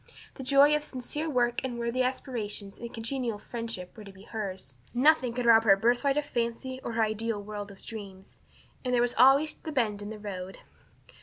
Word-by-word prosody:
The -, -, -9 dB
joy 280 Hz, +3 st, +5 dB
of 300 Hz, -, -1 dB
sincere 295 Hz, +3 st, -4 dB
work 240 Hz, -3 st, +1 dB
and 250 Hz, -2 st, -3 dB
worthy 235 Hz, +2 st, -1 dB
aspiration 230 Hz, -6 st, -3 dB
and 235 Hz, 0 st, -7 dB
congenial 230 Hz, -1 st, -2 dB
friendship 225 Hz, -5 st, -6 dB
were 215 Hz, -, -10 dB
to 200 Hz, -, -11 dB
be 190 Hz, 0 st, -15 dB
hers; 190 Hz, -, -6 dB, 0.2 s
nothing 260 Hz, -1 st, +4 dB
could 245 Hz, +1 st, -3 dB
rob 225 Hz, -1 st, +7 dB
her 205 Hz, -3 st, +7 dB
of -, -, +1 dB
her 235 Hz, +4 st, +5 dB
birthright 275 Hz, +3 st, 0 dB
of 295 Hz, -, +1 dB
fancy 250 Hz, +1 st, -3 dB
or 235 Hz, -, -4 dB
her 225 Hz, 0 st, +2 dB
ideal 220 Hz, 0 st, -1 dB
world 205 Hz, 0 st, -6 dB
of 195 Hz, -1 st, -14 dB
dreams. 195 Hz, -4 st, -9 dB, 0.5 s
And 250 Hz, -1 st, +1 dB
there -, -, +3 dB
was 245 Hz, -, 0 dB
always 275 Hz, +5 st, +5 dB
the 315 Hz, -, -8 dB
bend 220 Hz, -7 st, 0 dB
in 205 Hz, -, -6 dB
the 220 Hz, -, -6 dB
road! 190 Hz, -3 st, -6 dB
235 Hz, 210 wpm, -29 LUFS, 210-255 Hz, 0.5 s, rob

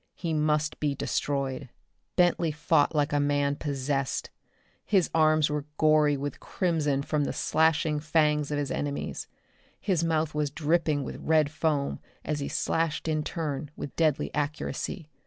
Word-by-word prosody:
He 170 Hz, -2 st, -3 dB
must 150 Hz, 0 st, +1 dB
be 145 Hz, -2 st, 0 dB
destroyed. 140 Hz, -1 st, -2 dB, 0.5 s
Bentley 175 Hz, -2 st, +3 dB
fought 155 Hz, 0 st, +2 dB
like 145 Hz, 0 st, +1 dB
a 145 Hz, -, +3 dB
man 145 Hz, 0 st, +1 dB
possessed. 140 Hz, -2 st, -2 dB, 0.5 s
His 190 Hz, -5 st, +2 dB
arms 155 Hz, -1 st, +4 dB
were 150 Hz, -1 st, -3 dB
gory 155 Hz, -2 st, +4 dB
with 140 Hz, 0 st, -4 dB
crimson 150 Hz, -6 st, 0 dB
from 150 Hz, 0 st, 0 dB
the -, -, -1 dB
slashing 160 Hz, -1 st, +2 dB
fangs 150 Hz, -1 st, +2 dB
of 150 Hz, -, -1 dB
his 145 Hz, -2 st, -2 dB
enemies. 145 Hz, -1 st, -3 dB, 0.5 s
His 180 Hz, -5 st, 0 dB
mouth 160 Hz, -2 st, +1 dB
was 150 Hz, -1 st, 0 dB
dripping 155 Hz, -1 st, +1 dB
with -, -, -6 dB
red 155 Hz, -2 st, +2 dB
foam 150 Hz, -2 st, 0 dB, 0.3 s
as 150 Hz, -1 st, -1 dB
he 140 Hz, -, -3 dB
slashed 165 Hz, -1 st, -1 dB
in 155 Hz, -1 st, +1 dB
turn, 150 Hz, -4 st, -3 dB
with 140 Hz, -, -7 dB
deadly 155 Hz, -4 st, +1 dB
accuracy. 150 Hz, +2 st, -3 dB
150 Hz, 150 wpm, -28 LUFS, 145-160 Hz, 0.5 s, arms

